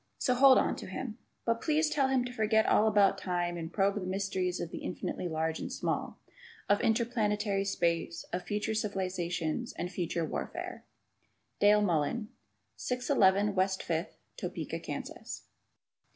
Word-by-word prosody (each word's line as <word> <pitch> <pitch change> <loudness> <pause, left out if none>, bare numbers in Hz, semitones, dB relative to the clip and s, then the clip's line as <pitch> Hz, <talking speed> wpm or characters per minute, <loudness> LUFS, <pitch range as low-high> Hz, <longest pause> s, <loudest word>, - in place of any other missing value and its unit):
So 250 - +2
hold 260 +1 +7
on - - +2
to - - -7
him. 220 +4 -5 0.3
But, 230 0 +1
please 310 0 +2
tell 285 -3 +2
him 260 -2 +2
to 245 - -6
forget 220 -1 +3
all 215 - +4
about 200 -2 +4
time 175 -2 -1
and 165 -1 -5
probe 200 +1 +2
the 205 - -3
mysteries 185 -1 -1
of 170 - -4
the - - -5
infinitely 180 - -4
large 160 0 -1
and - - -5
small, - - -2 0.5
of 205 - +3
interplanetary 215 -3 +1
space, 170 -3 0
of 180 - 0
future 210 +4 -2
civilization 185 -4 -1
and 180 - -3
future 170 -2 -1
warfare. - - -5 0.7
Dale 210 +1 +6
Mullen, 185 +5 0 0.5
611 210 -6 +2
West 190 0 +1
Fifth, 165 +3 -2 0.2
Topeka, - - -4
Kansas. - - -6
200 Hz, 150 wpm, -31 LUFS, 180-220 Hz, 0.7 s, hold